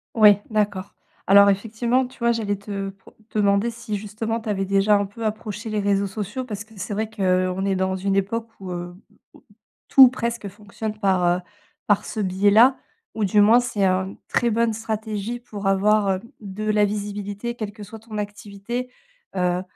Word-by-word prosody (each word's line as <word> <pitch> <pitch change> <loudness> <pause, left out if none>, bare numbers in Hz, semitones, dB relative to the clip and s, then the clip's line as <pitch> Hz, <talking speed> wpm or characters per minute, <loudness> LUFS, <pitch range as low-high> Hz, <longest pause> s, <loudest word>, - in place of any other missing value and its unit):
Ouais, 210 -3 +7
d'accord. 205 -3 -1 0.3
Alors 200 +1 +7
effectivement, 230 +5 0
tu 255 - -18
vois, 235 0 +3
j'allais 215 -3 -1
te 200 0 -5
pro 195 0 -17 0.2
demander, 200 +1 +3
si 230 -2 -5
justement, 215 +3 -3
tu 220 - -6
avais 195 -2 0
déjà 195 +2 +3
un 205 0 +1
peu 205 +4 -9
approché 215 0 -4
les 215 -1 -1
réseaux 200 0 +1
sociaux 215 +6 -5
parce 210 -5 -6
que 220 +2 -21
c'est 195 +2 -4
vrai 220 +2 -1
qu'on 185 -3 0
est 195 -1 +1
dans 190 0 0
une 195 +1 -1
époque 220 +4 -1
où, 190 -2 -7
heu, 175 0 -6 0.4
où - - -19 0.4
tout 270 - +8
ou 255 - +9
presque 235 -3 -3
fonctionne 210 +2 -7
par, 190 -3 +2
heu, 175 +1 +3 0.5
par 205 -1 +2
ce - - -5
biais-là, 205 +7 +4 0.4
ou 215 - 0
du 205 +2 +4
moins 220 +4 +6
c'est, 210 -5 0
heu, - - +3 0.2
une 195 - -10
très 240 - +1
bonne 230 0 +1
stratégie 220 +1 -4
pour 210 -4 -6
avoir, 200 +1 +3
heu, 185 - -2 0.2
de 205 0 -6
la 210 -1 +4
visibilité 205 +2 -4
quelle 215 -3 -5
que 210 -1 -10
soit 220 +3 -10
ton 220 -1 -8
activité. 205 +4 -5 0.5
Heu 180 -1 +1
205 Hz, 190 wpm, -23 LUFS, 195-220 Hz, 0.5 s, ou